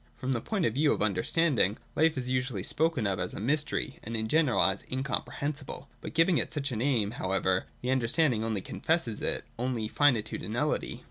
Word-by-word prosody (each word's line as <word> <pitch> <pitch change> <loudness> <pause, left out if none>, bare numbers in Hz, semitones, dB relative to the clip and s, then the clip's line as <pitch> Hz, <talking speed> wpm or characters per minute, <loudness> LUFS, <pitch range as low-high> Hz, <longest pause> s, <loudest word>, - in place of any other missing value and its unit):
From 130 +1 -2
the 120 - -1
point 200 - -1
of 110 - +1
view 145 +3 +3
of - - -4
under 100 -4 +1
standing, 135 - +2 0.2
life 160 -1 +3
is 125 -1 -2
usually 125 -6 -1
spoken 155 -2 +1
of 95 -2 0
as - - -2
a - - -5
mj'stery, 145 +3 -1
and 115 +1 -4
in 110 0 -2
general 145 -5 +2
as 95 0 +2
incomprehensible. 140 +2 -3
By - - -5
giving 165 +1 +3
it - - -1
such 145 -2 -1
a - - -2
name, 115 -3 +1
however, 95 -3 0 0.2
the 125 - 0
Understanding 130 -1 +2
only 110 -3 -1
confesses 160 - -1
its - - -1
own 125 +1 -1
finitude 130 -7 +2
and - - -5
nullity. - - -1
130 Hz, 200 wpm, -29 LUFS, 110-150 Hz, 0.2 s, view